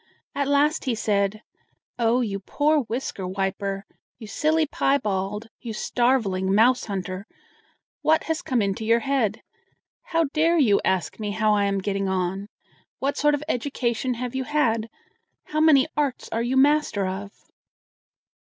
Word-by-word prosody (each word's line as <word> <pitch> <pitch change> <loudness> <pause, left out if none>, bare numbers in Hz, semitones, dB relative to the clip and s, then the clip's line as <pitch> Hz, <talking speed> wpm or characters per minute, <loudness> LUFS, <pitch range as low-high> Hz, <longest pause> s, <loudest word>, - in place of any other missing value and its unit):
At 280 -1 -1
last 290 +2 +2
he 250 -3 0
said: 205 0 0 0.6
"Oh, 235 +2 +3
you 200 -4 -2
poor 300 +9 +1
whisker 220 -5 -4
wiper, 195 +1 -3 0.3
you 230 - -10
silly 310 +9 +1
piebald, 210 -7 -1
you 230 -3 -6
starveling 210 -5 +1
mouse 240 +4 +4
hunter! 195 -1 -5 0.7
what 315 +1 +3
has 320 -1 -2
come 245 -5 0
into 200 +2 -2
your 230 +1 +3
head? 245 -6 0 0.6
How 330 -1 +1
dare 330 +2 +3
you 225 -10 +4
ask 190 +2 -1
me 210 -1 -3
how 215 +1 +2
I 205 -1 +2
am 200 0 0
getting 195 0 -1
on? 190 +1 -2 0.5
What 275 +1 -1
sort 295 0 +3
of 290 - -6
education 250 -2 -1
have 245 +1 -4
you 265 0 -2
had? 230 -7 +1 0.5
How 305 - -3
many 305 -4 +6
arts 285 -4 -1
are 225 - -1
you 245 +3 0
master 285 -7 +3
of?" 195 +2 -4
230 Hz, 150 wpm, -24 LUFS, 200-280 Hz, 0.7 s, many